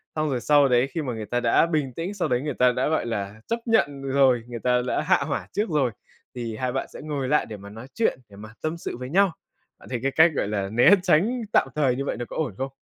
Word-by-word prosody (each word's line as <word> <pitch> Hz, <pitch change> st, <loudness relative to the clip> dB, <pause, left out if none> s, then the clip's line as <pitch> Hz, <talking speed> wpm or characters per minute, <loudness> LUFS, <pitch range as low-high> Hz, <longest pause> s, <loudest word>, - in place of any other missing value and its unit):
Xong 155 Hz, -1 st, 0 dB
rồi 125 Hz, -4 st, -1 dB
sau 145 Hz, -2 st, +4 dB
đấy 125 Hz, +1 st, +3 dB
khi 165 Hz, -, -1 dB
mà 130 Hz, -5 st, -3 dB
người 110 Hz, -1 st, -5 dB
ta 120 Hz, +4 st, -1 dB
đã 120 Hz, +6 st, +3 dB
bình 150 Hz, -6 st, -1 dB
tĩnh, 170 Hz, +9 st, -4 dB
sau 195 Hz, -, -1 dB
đấy 125 Hz, 0 st, 0 dB
người 150 Hz, -1 st, -3 dB
ta 125 Hz, 0 st, +4 dB
đã, 125 Hz, +1 st, -1 dB
gọi 155 Hz, -5 st, 0 dB
là, 105 Hz, -1 st, -4 dB
chấp 230 Hz, -, -1 dB
nhận 145 Hz, -12 st, +1 dB
rồi, 135 Hz, -3 st, +3 dB
người 120 Hz, -1 st, -6 dB
ta 125 Hz, +2 st, +2 dB
đã -, -, 0 dB
hạ 185 Hz, +5 st, +3 dB
hỏa 140 Hz, -, -3 dB
trước 210 Hz, -1 st, -1 dB
rồi, 140 Hz, -6 st, +1 dB, 0.4 s
thì 115 Hz, -3 st, -4 dB
hai 125 Hz, +2 st, -2 dB
bạn 135 Hz, -, -3 dB
sẽ -, -, -9 dB
ngồi 145 Hz, -3 st, -3 dB
lại 150 Hz, +2 st, +2 dB
để 110 Hz, -, -8 dB
mà 100 Hz, +1 st, -11 dB
nói 115 Hz, +5 st, -10 dB
chuyện, 225 Hz, -, 0 dB
để 100 Hz, -, -15 dB
mà 105 Hz, +1 st, -10 dB
tâm 155 Hz, +2 st, -2 dB
sự 145 Hz, -, -6 dB
với 125 Hz, 0 st, -7 dB
nhau. 195 Hz, +4 st, +3 dB, 0.5 s
Bạn -, -, -15 dB
thấy 125 Hz, -2 st, -2 dB
cái 135 Hz, -, +1 dB
cách, 160 Hz, +3 st, +5 dB
gọi -, -, 0 dB
là, 100 Hz, -2 st, -2 dB
né 120 Hz, -, +5 dB
tránh 195 Hz, +8 st, +2 dB
tạm -, -, +4 dB
thời 135 Hz, -5 st, +2 dB
như 140 Hz, +2 st, -3 dB
vậy -, -, -3 dB
nó 120 Hz, -, -4 dB
có -, -, -8 dB
ổn 135 Hz, -12 st, -2 dB
không? 135 Hz, +1 st, -3 dB
130 Hz, 280 wpm, -24 LUFS, 120-155 Hz, 0.5 s, cách